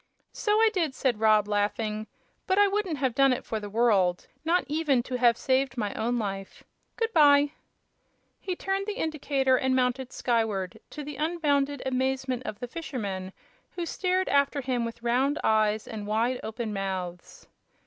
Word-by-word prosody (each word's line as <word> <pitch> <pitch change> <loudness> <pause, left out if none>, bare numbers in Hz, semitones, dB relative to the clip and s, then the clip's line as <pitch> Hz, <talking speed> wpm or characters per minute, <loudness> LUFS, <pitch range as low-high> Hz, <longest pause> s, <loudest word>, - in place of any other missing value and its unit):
"So 420 - 0
I 445 -1 +5
did," 325 -8 0
said 245 -5 0
Rob, 215 -2 +4
laughing; 210 +1 -1 0.4
"but 375 0 +2
I 410 0 +6
wouldn't 395 -5 -1
have 260 -3 0
done 275 +1 +4
it 250 - -2
for 220 - -3
the 205 -1 -7
world 200 -5 +2 0.2
not 340 +3 +2
even 290 -4 +1
to 250 0 -4
have 240 -1 +4
saved 265 0 0
my 210 -3 -2
own 240 +2 -1
life. 195 -3 -5 0.3
Good 455 0 -1
by!" 290 -3 +6 0.9
He 370 -2 -3
turned 390 +2 -2
the 420 - -2
indicator 275 -4 +1
and 260 0 +1
mounted 255 0 0
skyward, 220 -7 -1
to 300 - -7
the 290 0 -7
unbounded 290 -4 0
amazement 260 -1 -1
of 205 - -5
the 245 - -5
fishermen, 205 - -5 0.4
who 345 - -3
stared 370 +2 0
after 280 0 +2
him 250 -2 -1
with 230 0 -7
round 260 +5 +2
eyes 215 0 +2
and 210 -2 -6
wide 230 +4 0
open 220 0 -4
mouths. 185 -3 -5
255 Hz, 170 wpm, -27 LUFS, 215-290 Hz, 0.9 s, I